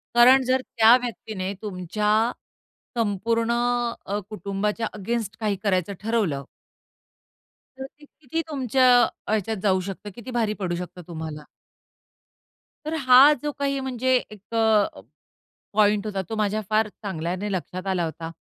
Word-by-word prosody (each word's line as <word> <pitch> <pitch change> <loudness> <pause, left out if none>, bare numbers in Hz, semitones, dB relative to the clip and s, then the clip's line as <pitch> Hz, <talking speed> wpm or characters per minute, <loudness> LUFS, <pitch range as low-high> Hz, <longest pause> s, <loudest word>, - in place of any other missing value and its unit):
कारण 255 +2 +7
जर 260 0 +2
त्या 230 -1 +5
व्यक्तीने 210 -5 -4
तुमच्या 210 0 -3 0.9
संपूर्ण 230 +2 0 0.5
अ, 205 +1 -2
कुटुंबाच्या 210 +2 -2
अगेन्स्ट 220 +1 -3
काही 210 -2 0
करायचं 195 -1 +1
ठरवलं 195 - 0 1.3
तर 265 - -5
ते 295 - -15
किती 305 +2 -5
तुमच्या 260 -3 +1 0.4
ह्याच्यात 220 0 0
जाऊ 190 -2 +3
शकतं, 200 +2 -6
किती 240 +2 -8
भारी 225 -3 0
पडू 175 -3 -1
शकतं 180 +1 -7
तुम्हाला. 160 -3 -7 1.4
तर 310 - -3
हा 260 +3 +8
जो 295 - -1
काही 275 -1 0
म्हणजे 260 0 0 0.2
एक 210 +2 -14
अ, 220 - +2 0.7
पॉइंट 210 0 +3
होता, 200 -2 -2
तो 225 - -3
माझ्या 215 0 0
फार 215 0 +2
चांगल्याने 190 0 -4
लक्षात 185 +1 -4
आला 185 -2 0
होता. 165 0 -6
210 Hz, 130 wpm, -24 LUFS, 190-235 Hz, 1.4 s, हा